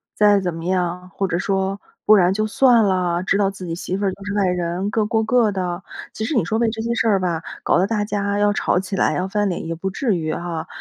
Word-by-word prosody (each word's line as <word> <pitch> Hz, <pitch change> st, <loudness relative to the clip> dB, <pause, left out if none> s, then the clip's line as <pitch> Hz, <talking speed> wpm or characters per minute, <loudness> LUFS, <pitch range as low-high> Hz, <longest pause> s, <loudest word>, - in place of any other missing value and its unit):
再 205 Hz, -1 st, +5 dB
怎 180 Hz, -3 st, -2 dB
么 165 Hz, 0 st, -7 dB
样， 180 Hz, 0 st, -2 dB
或 195 Hz, -, -1 dB
者 175 Hz, -, -1 dB
说 195 Hz, +1 st, -1 dB, 0.2 s
不 215 Hz, -, +6 dB
然 185 Hz, -2 st, +4 dB
就 215 Hz, +2 st, 0 dB
算 240 Hz, 0 st, +4 dB
啦， 180 Hz, -3 st, +1 dB
知 195 Hz, +1 st, +1 dB
道 200 Hz, -1 st, +2 dB
自 190 Hz, -2 st, -9 dB
己 165 Hz, -, -3 dB
媳 180 Hz, +1 st, -4 dB
妇 200 Hz, +1 st, -2 dB
就 195 Hz, +1 st, -8 dB
是 205 Hz, -, -3 dB
外 200 Hz, -2 st, +2 dB
人， 180 Hz, +2 st, -1 dB
各 215 Hz, 0 st, 0 dB
过 220 Hz, +1 st, +1 dB
各 225 Hz, -1 st, +3 dB
的。 180 Hz, -2 st, -3 dB, 0.3 s
其 220 Hz, -, -3 dB
实 310 Hz, -, -2 dB
你 225 Hz, -, +3 dB
说 215 Hz, -, -1 dB
为 230 Hz, 0 st, +2 dB
这 220 Hz, 0 st, -5 dB
些 235 Hz, +1 st, -1 dB
事 235 Hz, -, +1 dB
儿 200 Hz, -3 st, +3 dB
吧， 170 Hz, -3 st, -2 dB, 0.2 s
搞 -, -, +3 dB
得 180 Hz, -, +3 dB
大 210 Hz, 0 st, -1 dB
家 200 Hz, 0 st, -1 dB
要 205 Hz, 0 st, +3 dB
吵 180 Hz, -, +1 dB
起 190 Hz, +1 st, -4 dB
来 -, -, +2 dB
要 185 Hz, -, -1 dB
翻 205 Hz, +1 st, 0 dB
脸 175 Hz, -2 st, -4 dB
也 165 Hz, -, -3 dB
不 190 Hz, +4 st, -4 dB
至 215 Hz, +1 st, 0 dB
于 155 Hz, -2 st, -2 dB
哈。 170 Hz, -2 st, -4 dB
195 Hz, 290 characters per minute, -21 LUFS, 180-210 Hz, 0.3 s, 不